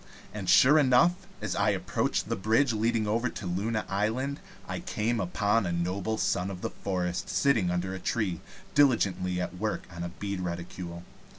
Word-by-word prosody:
And 100 -4 -4
sure 140 +10 +7
enough, 140 +5 +5 0.3
as - - -2
I - - +2
approached - - -1
the - - -1
bridge 115 +6 +2
leading 110 0 +1
over 115 +4 0
to 105 - -7
Luna 105 +5 -1
Island, 115 +8 -1 0.3
I - - -3
came 115 +2 -1
upon 100 +3 +1
a - - -1
noble 90 +5 -1
Son 90 -2 0
of 90 -2 -7
the - - -3
Forest 90 -2 -3
sitting 115 -10 +2
under 90 +1 -1
a 95 - -5
tree, 95 -7 -1 0.3
diligently 100 -10 +3
at 90 0 -4
work - - -2
on 85 - -6
a 85 - -3
bead 100 +2 -5
reticule. 85 0 -5
100 Hz, 175 wpm, -29 LUFS, 90-115 Hz, 0.3 s, sure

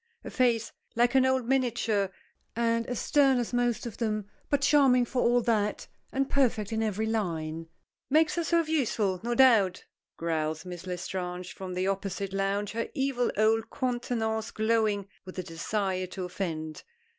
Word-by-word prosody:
A - - -7
face 235 -3 +1 0.2
like 240 +1 +3
an 260 -1 +5
old 260 -2 +1
miniature; 235 -6 +1 0.5
and 230 0 +1
as 245 - -3
stern 275 -3 +4
as 240 0 -2
most 240 -1 +1
of 235 - -6
them, 215 -3 -1 0.2
but 285 -1 +2
charming 275 -4 +5
for 250 +1 -1
all 240 +1 +4
that 215 -3 0 0.2
and 270 0 0
perfect 235 -7 +1
in 220 - 0
every 215 0 -1
line. 165 -7 -2 0.4
"Makes 310 +2 +4
herself 335 -1 +1
useful, 220 - 0
no 240 +2 -1
doubt," 225 -9 +4 0.3
growls 160 -1 -2
Miss 180 0 -8
L'Estrange 180 0 -4
from 185 -1 -6
the 185 +1 0
opposite 195 0 -2
lounge, 195 +1 0
her 230 +1 -3
evil 265 -3 0
old 220 +1 +2
countenance 240 -4 -2
glowing 215 -2 +1 0.2
with 185 -1 -10
the 185 - -3
desire 185 +3 -2
to 185 +1 -6
offend. 160 -4 -4
220 Hz, 155 wpm, -28 LUFS, 190-245 Hz, 0.5 s, an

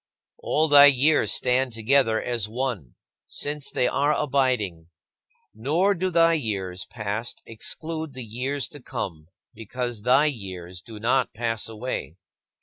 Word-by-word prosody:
All 155 +1 +1
thy 145 -1 +9
years 145 +3 +3
stand 125 0 +2
together 115 0 +2
as 115 -4 -2
one, 115 - -4 0.3
since 145 -1 -2
they 125 - +1
are 145 +2 +2
abiding. 125 - 0 0.7
Nor 155 - +2
do 185 0 -1
thy 165 -1 +4
years 95 - -3
past 110 0 -4
exclude 155 +6 -4
the 130 -2 -6
years 130 +5 -3
to 145 -4 -10
come 80 -9 -6 0.3
because 120 +1 -5
thy 130 +6 +4
years 95 - -5
do 110 +1 -11
not 125 +3 +1
pass 115 -1 -2
away. 110 -7 -5
125 Hz, 135 wpm, -25 LUFS, 110-145 Hz, 0.7 s, thy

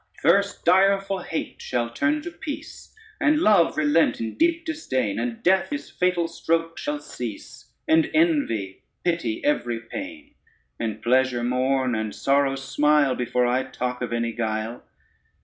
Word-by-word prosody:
First 200 0 +2
direful 195 +2 +3
hate 165 -2 -5
shall 120 -1 -2
turn 305 - 0
to 345 - -6
peace, 315 -3 -8 0.3
And 300 0 +3
love 210 - +4
relent 155 +2 +3
in 115 -1 -3
deep 330 0 +1
disdain, 130 - -2
And 115 -1 -4
death 190 +1 +3
his 290 0 -5
fatal 180 -2 +1
stroke 165 0 -1
shall 295 0 -2
cease, - - -8 0.2
And 320 0 +4
envy 285 - +1 0.2
pity 165 -11 -1
every 120 -5 0
pain, 290 - -8 0.5
And 110 -1 -4
pleasure 125 0 +2
mourn 130 +1 +1
and 110 -1 -3
sorrow 140 0 +2
smile, 145 +1 +2
Before 125 0 0
I 125 +2 +2
talk 125 -1 -4
of 125 - -3
any 115 0 -1
guile. 110 0 -3
145 Hz, 145 wpm, -24 LUFS, 120-200 Hz, 0.5 s, love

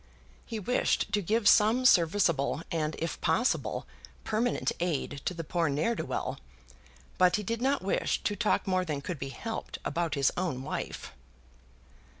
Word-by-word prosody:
He 230 - -4
wished 230 +5 0
to 205 - +2
give 210 +3 +1
some 225 +6 +5
serviceable, 170 - +3
and, 155 -2 -1
if 165 0 -4
possible, 245 +3 +1 0.4
permanent 230 +3 0
aid 150 -4 -2
to 180 - -1
the 165 - -4
poor 165 0 0
ne'er 150 +11 +1
do - - -4
well; - - -3 0.8
but 180 -1 +5
he 210 - -2
did 230 +4 -3
not 275 -1 +1
wish 195 - 0
to 205 - 0
talk 215 0 +1
more 185 -1 +1
than 150 -5 -3
could 165 +1 -5
be 135 - -4
helped 225 +11 -5
about 165 0 -1
his 140 -2 +3
own 160 -8 -2
wife. 135 - -5
180 Hz, 160 wpm, -29 LUFS, 155-215 Hz, 0.8 s, some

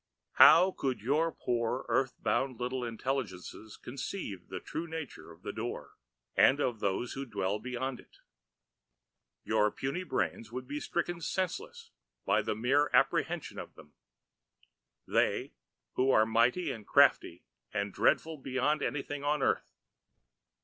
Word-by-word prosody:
"How 175 +5 +8
could 135 -7 -2
your 150 +9 +1
poor, 120 -1 -2
earth 130 -2 +1
bound 130 -3 -1
little 125 +1 -2
intelligences 115 -4 -4
conceive 120 - -6
the - - -5
true 165 +1 -5
nature 160 - -7
of 85 +3 -17
the - - -4
Door 115 +2 -5 0.4
and 140 - +5
of 120 -6 0
those 100 +5 -1
who 135 - -4
dwell 105 -4 -2
beyond 125 +2 -4
it? - - -18 1.3
Your 105 - +2
puny 135 - -3
brains 115 -10 -2
would 125 +1 -6
be 145 +2 -4
stricken 170 +2 -2
senseless 455 - -3 0.3
by - - +3
mere 135 +7 +1
apprehension - - +1
of - - -9
them, 75 - -16 1.1
They - - +1 0.4
who 130 +1 +2
are 110 -4 +5
mighty 120 +9 +2
and 110 -5 -8
crafty 85 - +4 0.3
and 100 -2 -2
dreadful 160 -2 +1
beyond 135 +3 0
anything 145 0 -3
on 145 -1 +1
earth." - - +1
130 Hz, 135 wpm, -31 LUFS, 110-150 Hz, 1.3 s, How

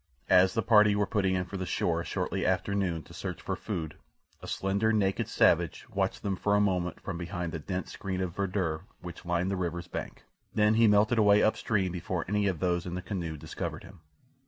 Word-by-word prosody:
As 95 +1 +6
the 115 - +1
party 105 -1 +5
were 105 0 +2
putting 95 -2 +1
in 90 0 -1
for 95 - -6
the 95 - -3
shore - - 0
shortly - - -2
after 100 - +1
noon 90 -5 -1
to - - -15
search - - -5
for - - -3
food 80 -2 -5 0.4
a - - -9
slender, 100 +3 0
naked 100 -3 +1
savage - - +2
watched - - -1
them 100 -1 0
for 100 +2 +1
a - - +4
moment 90 -4 0
from 90 -3 -5
behind 85 0 -4
the 80 - -4
dense 90 +4 -4
screen 95 -2 -4
of 90 -2 -3
verdure 90 -5 -1 0.2
which 90 0 -9
lined 90 +2 0
the - - 0
river's 85 -1 -3
bank, - - -6 0.3
then 105 0 +4
he 115 0 +5
melted 105 +3 +4
away 105 -1 +5
up 110 - +3
stream 95 -5 0
before 90 -1 -3
any 105 +1 +1
of 95 -4 0
those 90 -1 0
in 90 - -4
the 90 - -3
canoe 85 -6 -4
discovered - - -5
him. 90 +1 -14
95 Hz, 215 wpm, -29 LUFS, 85-100 Hz, 0.4 s, As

